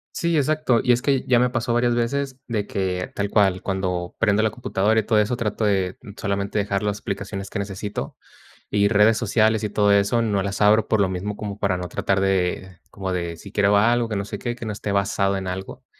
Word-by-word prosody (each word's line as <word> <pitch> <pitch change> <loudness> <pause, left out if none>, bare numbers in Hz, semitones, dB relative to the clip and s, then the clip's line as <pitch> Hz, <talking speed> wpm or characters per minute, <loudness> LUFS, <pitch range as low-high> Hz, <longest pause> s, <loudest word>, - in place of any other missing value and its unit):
Sí, 170 -2 +1
exacto. 150 -4 +2
Y 125 - +3
es 120 0 +3
que 135 -1 +1
ya 125 -2 +4
me 125 0 +3
pasó 120 -1 -1
varias 120 0 +2
veces 135 +3 -1
de 105 -3 -2
que, 90 -2 -2
tal 100 0 -2
cual, 95 -3 +2
cuando 90 -2 -2
prendo 110 -1 +3
la 110 - +1
computadora 110 -2 +1
y - - 0
todo 110 +1 +1
eso, 105 +3 +2
trato 110 -2 -2
de 95 -3 0 0.2
solamente 100 0 -1
dejar 100 0 -1
las 105 0 -1
aplicaciones 100 0 -5
que - - -5
necesito. 100 +1 -5 0.6
Y 100 0 +3
redes 105 +1 +4
sociales 110 -1 +2
y 105 - 0
todo 105 0 +2
eso, 100 +4 +3
no 105 -4 0
las 100 +1 -2
abro, 105 +1 +4
por 110 -2 +3
lo 95 - +1
mismo, 100 +3 -4
como 105 -1 -6
para 100 -3 0
no 90 0 -5
tratar 95 +2 0
de, 95 -1 -1
como 95 -2 -4
de 85 -2 -3
si 100 +4 -12
quiero 100 -1 +3
ver 100 - +5
algo, 120 +1 +2
que 105 - -3
no 100 - -2
sé 105 0 -6
qué, 120 +3 -3
que 115 - -8
no 110 - -3
esté 100 0 -4
basado 100 0 +1
en 95 -1 -4
algo. 95 +1 -6
105 Hz, 235 wpm, -23 LUFS, 100-115 Hz, 0.6 s, ver